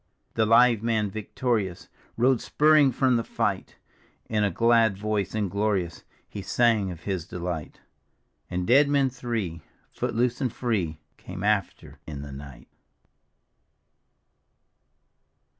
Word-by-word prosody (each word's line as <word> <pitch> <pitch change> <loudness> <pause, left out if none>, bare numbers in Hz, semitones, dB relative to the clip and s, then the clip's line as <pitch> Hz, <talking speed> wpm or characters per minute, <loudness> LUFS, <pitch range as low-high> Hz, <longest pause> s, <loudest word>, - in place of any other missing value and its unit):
The 110 -1 +1
live 115 -1 +5
man 110 -3 0
victorious 110 -2 -2 0.3
Rode 125 +1 +3
spurring 150 -2 +4
from 125 0 +2
the 115 - -1
fight; 105 -6 -2 0.5
In 105 -2 0
a 100 - +2
glad 115 +1 +3
voice 105 -1 -2
and 105 -2 0
glorious 100 -5 -1 0.2
He 100 - -7
sang 110 -1 +2
of 85 -3 -8
his 95 -2 -4
delight. 85 -4 -5 0.7
And 90 0 -2
dead 135 +6 +5
men 140 -2 +2
three, 115 -10 -4 0.3
foot - - -3
loose 120 +3 0
and 130 -3 0
free. 100 -12 -2 0.2
Came 90 - -8
after 105 -3 -1
in 70 -2 -6
the 70 - -8
night. 70 -3 -11
105 Hz, 125 wpm, -26 LUFS, 90-120 Hz, 0.7 s, live